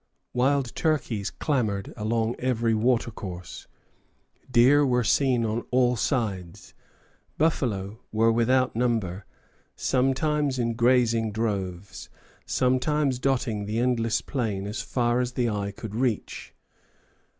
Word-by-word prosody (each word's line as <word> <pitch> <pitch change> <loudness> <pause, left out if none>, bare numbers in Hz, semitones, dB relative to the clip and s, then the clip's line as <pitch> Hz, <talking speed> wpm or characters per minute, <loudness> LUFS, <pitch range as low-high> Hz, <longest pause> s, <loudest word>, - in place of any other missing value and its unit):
Wild 130 0 +1
turkeys 120 -10 -1
clamored 110 -9 -2
along 110 +2 -1
every 120 -3 +1
watercourse; 110 -6 -2 0.8
deer 130 +4 +5
were 125 -3 +2
seen 125 -1 +2
on 110 +2 -1
all 125 0 +3
sides, 100 - -3 0.6
buffalo 110 -10 0
were 115 +1 +3
without 125 +2 +2
number, 110 -6 -1 0.5
sometimes 135 +2 +1
in 115 -1 0
grazing 115 -2 +2
droves, 100 -4 -4 0.3
and - - -26
sometimes 130 +1 +1
dotting 125 -6 -1
the 110 +2 -2
endless 120 -2 +1
plain 110 -7 -3
as 105 +2 -4
far 120 -1 0
as 125 0 -1
the 125 -1 0
eye 105 -2 -2
could 100 +1 -8
reach. 120 -2 -2
120 Hz, 115 wpm, -26 LUFS, 110-130 Hz, 0.8 s, deer